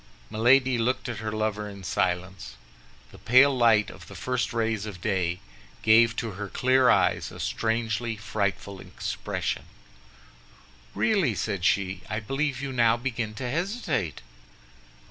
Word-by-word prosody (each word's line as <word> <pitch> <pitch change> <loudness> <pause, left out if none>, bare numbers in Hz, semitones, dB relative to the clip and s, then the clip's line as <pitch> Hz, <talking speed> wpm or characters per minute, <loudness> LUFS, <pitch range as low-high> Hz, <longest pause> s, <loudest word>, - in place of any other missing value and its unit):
Milady 125 +3 +4
looked 125 +3 0
at 115 -3 -4
her 110 -1 -4
lover 105 -1 -2
in 100 -1 -10
silence. 95 0 -2 0.6
The - - -14
pale 130 +5 +5
light 115 -4 +4
of - - -13
the - - -11
first 125 -3 -2
rays 110 -3 -1
of 95 -4 -8
day 90 0 -1 0.4
gave 115 +1 +5
to 115 -1 -3
her 100 +2 -6
clear 130 +2 +3
eyes - - +2
a - - -11
strangely 115 0 -1
frightful 100 -2 -3
expression. - - -4 1.3
"Really," 190 - +2
said 100 0 -3
she, 95 -2 +1
"I 110 - -2
believe 135 +5 -2
you 135 -1 -4
now 115 -2 +3
begin 115 -3 -3
to 125 +2 -4
hesitate." 160 - -2
110 Hz, 140 wpm, -26 LUFS, 100-125 Hz, 1.3 s, pale